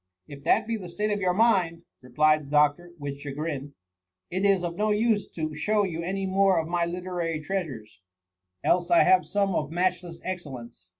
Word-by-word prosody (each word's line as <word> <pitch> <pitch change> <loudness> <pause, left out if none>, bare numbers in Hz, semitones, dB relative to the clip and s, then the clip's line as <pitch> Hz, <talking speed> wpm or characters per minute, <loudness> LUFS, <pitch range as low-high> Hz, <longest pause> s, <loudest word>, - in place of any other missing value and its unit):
'* 90 - -61
'* - - -47
If 140 - -14
that 220 - +3
be 230 0 -2
the 180 -4 -8
state 210 +5 -2
of 205 - 0
your 180 -1 +1
mind, 185 -7 +2 0.2
replied 150 +5 +2
the 140 - -12
doctor, 150 +4 +2
with 140 -2 -6
chagrin, 145 0 -5 0.3
*' 90 0 -57
it 185 +2 -1
is 195 -3 +3
of 170 -1 -3
no 215 +3 0
use 210 0 +1
to 155 -2 -4
show 210 +7 +1
you 170 -4 -3
any 195 +3 -2
more 190 -1 +3
of 160 -1 0
my 170 0 0
literary 175 -2 -3
treasures; 150 - -5 0.6
else 175 0 +2
I 170 -1 +6
have 185 0 +4
some 200 -1 0
of 150 -3 -1
matchless 175 -1 -1
excellence. 130 - -7
175 Hz, 200 wpm, -26 LUFS, 150-190 Hz, 0.6 s, I